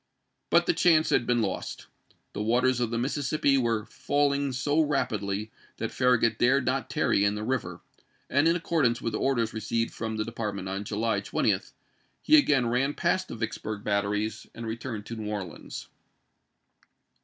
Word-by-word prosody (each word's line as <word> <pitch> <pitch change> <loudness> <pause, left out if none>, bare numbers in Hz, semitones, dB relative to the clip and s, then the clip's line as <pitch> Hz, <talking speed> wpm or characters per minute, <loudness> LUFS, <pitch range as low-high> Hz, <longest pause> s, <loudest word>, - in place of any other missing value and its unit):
But - - +4
the 345 - +3
chance 160 - +4
had 120 - +2
been 120 -2 +2
lost. 95 - -4 0.5
The - - -4
waters 125 +3 +2
of 120 -2 0
the 115 - -2
Mississippi 140 +2 +1
were 115 -5 +1
falling 140 +3 0
so 145 +4 0
rapidly 105 -8 -1 0.3
that - - -3
Farragut 115 -3 +2
dared 130 +2 +3
not - - -1
tarry 100 - +2
in 100 0 +2
the 105 - -4
river; 110 -8 -2 0.5
and 140 +4 +3
in 165 - +4
accordance 155 -8 +1
with 115 - -3
orders 120 -2 0
received 115 +1 -2
from 110 -1 -4
the 110 0 -1
Department 105 -4 -4
on 95 +2 -4
July 110 +2 0
20, - - +1 0.6
he 310 - +6
again 145 - +4
ran 125 +5 0
past 185 0 0
the - - -7
Vicksburg 110 -2 -4
batteries 105 +1 -1
and 115 - -6
returned 115 -1 -5
to 115 - -6
New 110 -2 -5
Orleans. 95 -6 -6
115 Hz, 165 wpm, -27 LUFS, 105-135 Hz, 0.6 s, he